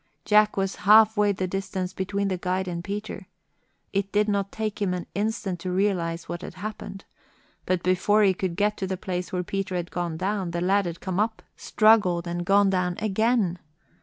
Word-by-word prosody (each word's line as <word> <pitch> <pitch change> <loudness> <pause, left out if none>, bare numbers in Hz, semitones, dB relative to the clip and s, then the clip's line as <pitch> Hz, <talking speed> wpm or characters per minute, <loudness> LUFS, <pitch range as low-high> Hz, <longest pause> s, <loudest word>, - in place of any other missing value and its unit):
Jack 210 0 +4
was 195 0 -1
half 215 +2 +6
way 205 -1 +3
the 190 -1 -2
distance 190 -1 -3
between 200 +1 -2
the 190 - 0
guide 185 +1 -1
and 170 -1 -4
Peter. 205 +3 -6 0.7
It 200 0 -1
did 210 +1 +2
not 200 -1 -1
take 215 -1 -4
him 185 -3 +1
an 180 - -5
instant 205 -3 -2
to 180 +1 -4
realize 180 -3 -1
what 175 - -5
had - - -8
happened. 200 0 -7 0.6
But 185 -1 0
before 185 +4 +3
he 195 -2 +4
could 185 -2 -3
get 210 +2 +1
to 190 - -3
the 190 0 -3
place 180 -2 -4
where 180 -1 -1
Peter 195 0 -3
had 175 -1 -3
gone 175 -2 -3
down, 190 0 -2
the - - 0
lad 195 +1 +2
had 170 -1 -6
come 190 0 -2
up, 220 +1 -1
struggled, 205 -6 +3
and 175 0 -3
gone 200 0 +4
down 180 -1 0
again. 215 -3 +1
195 Hz, 195 wpm, -25 LUFS, 180-205 Hz, 0.7 s, half